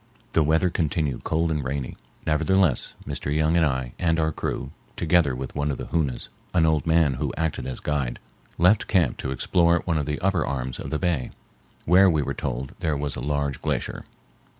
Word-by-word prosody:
The 80 Hz, -, +4 dB
weather 80 Hz, +4 st, +2 dB
continued 75 Hz, -6 st, -1 dB
cold 80 Hz, +1 st, 0 dB
and 75 Hz, -2 st, -1 dB
rainy. 65 Hz, 0 st, -3 dB, 0.3 s
Nevertheless 85 Hz, 0 st, +2 dB
Mr. 70 Hz, -, -3 dB
Young 80 Hz, +2 st, +2 dB
and 85 Hz, -, +4 dB
I 65 Hz, -5 st, -1 dB
and 85 Hz, -2 st, +2 dB
our 80 Hz, 0 st, +1 dB
crew, -, -, -4 dB, 0.2 s
together 80 Hz, -5 st, +2 dB
with 65 Hz, +1 st, -6 dB
one 75 Hz, 0 st, 0 dB
of 70 Hz, -, -2 dB
the -, -, -5 dB
Hoonas, 75 Hz, -7 st, -1 dB, 0.3 s
an 85 Hz, -2 st, +5 dB
old 80 Hz, -2 st, +1 dB
man 80 Hz, -3 st, +4 dB
who 75 Hz, -, 0 dB
acted 80 Hz, -6 st, -2 dB
as 65 Hz, -, -4 dB
guide, 70 Hz, -5 st, -1 dB, 0.4 s
left 90 Hz, +5 st, +4 dB
camp 90 Hz, -5 st, +2 dB
to -, -, -4 dB
explore 85 Hz, +6 st, +2 dB
one 85 Hz, -3 st, +1 dB
of 75 Hz, -, -3 dB
the 75 Hz, 0 st, -2 dB
upper 95 Hz, -4 st, +1 dB
arms 65 Hz, -2 st, -3 dB
of -, -, -5 dB
the 75 Hz, -, -1 dB
bay, 85 Hz, -7 st, 0 dB, 0.6 s
where 95 Hz, +3 st, +6 dB
we 80 Hz, -4 st, +2 dB
were -, -, -2 dB
told 65 Hz, 0 st, -4 dB
there 80 Hz, -3 st, 0 dB
was 70 Hz, -1 st, -3 dB
a -, -, -5 dB
large 70 Hz, 0 st, -1 dB
glacier. -, -, -2 dB
75 Hz, 195 wpm, -25 LUFS, 70-85 Hz, 0.6 s, where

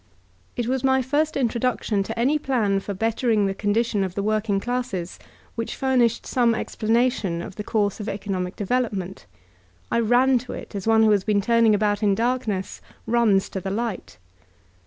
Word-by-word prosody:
It 240 Hz, -, -2 dB
was 260 Hz, 0 st, -1 dB
my 265 Hz, 0 st, +3 dB
first 295 Hz, +4 st, 0 dB
introduction 235 Hz, -4 st, 0 dB
to 225 Hz, +4 st, -5 dB
any 275 Hz, +6 st, +2 dB
plan 220 Hz, -9 st, +1 dB
for 200 Hz, 0 st, -6 dB
bettering 225 Hz, 0 st, +1 dB
the 195 Hz, -, 0 dB
condition 205 Hz, +1 st, 0 dB
of 185 Hz, -1 st, -4 dB
tl.e 200 Hz, -, -1 dB
working 215 Hz, -1 st, 0 dB
classes 240 Hz, -7 st, -3 dB, 0.3 s
which 230 Hz, -1 st, -4 dB
furnished 250 Hz, -4 st, +1 dB
some 240 Hz, -3 st, +2 dB
explanation 220 Hz, -6 st, 0 dB
c 170 Hz, -, -5 dB
' -, -, -20 dB
the 210 Hz, -, -5 dB
course 205 Hz, -2 st, 0 dB
of 210 Hz, -, -4 dB
economic 190 Hz, -2 st, -3 dB
development, 205 Hz, -4 st, -2 dB, 0.6 s
and -, -, +2 dB
I -, -, -2 dB
ran 250 Hz, +2 st, +4 dB
to 250 Hz, -, -8 dB
it -, -, -9 dB
as 200 Hz, 0 st, -5 dB
one 225 Hz, 0 st, +5 dB
who 215 Hz, -, +5 dB
has 200 Hz, -2 st, +2 dB
been 210 Hz, -1 st, +2 dB
turning 230 Hz, +1 st, +3 dB
about 205 Hz, 0 st, 0 dB
in 205 Hz, -2 st, +3 dB
dark 245 Hz, +3 st, 0 dB
ness 190 Hz, -2 st, -3 dB, 0.2 s
runs 225 Hz, -5 st, +2 dB
to 190 Hz, -, -5 dB
the 190 Hz, -, -4 dB
light. 220 Hz, -1 st, -4 dB
220 Hz, 185 wpm, -23 LUFS, 200-245 Hz, 0.6 s, one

